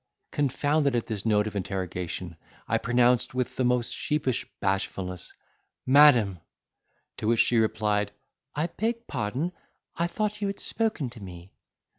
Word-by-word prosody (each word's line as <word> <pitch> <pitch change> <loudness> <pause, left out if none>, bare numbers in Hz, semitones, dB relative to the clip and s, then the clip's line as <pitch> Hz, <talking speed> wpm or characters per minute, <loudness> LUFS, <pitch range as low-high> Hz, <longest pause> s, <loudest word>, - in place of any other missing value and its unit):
Confounded 145 0 +1
at 120 - 0
this 110 0 -3
note 105 -1 +3
of 110 - -5
interrogation, 90 -2 -4 0.3
I 115 - +1
pronounced 120 +1 +2
with 125 -2 -1
the 130 - 0
most 125 -1 +1
sheepish 145 -5 -1
bashfulness, 95 -2 -2 0.5
"Madam!" 125 - +6 0.8
To - - -3
which 115 0 +4
she 120 - +3
replied, 105 -1 +1 0.4
"I 150 +3 +1
beg 230 +6 -2
pardon—I 160 - -4
thought 210 +3 -2
you 200 - +1
had 195 - -4
spoken 215 - -1
to 115 -3 -11
me." 90 -1 -10
120 Hz, 135 wpm, -27 LUFS, 105-145 Hz, 0.8 s, Madam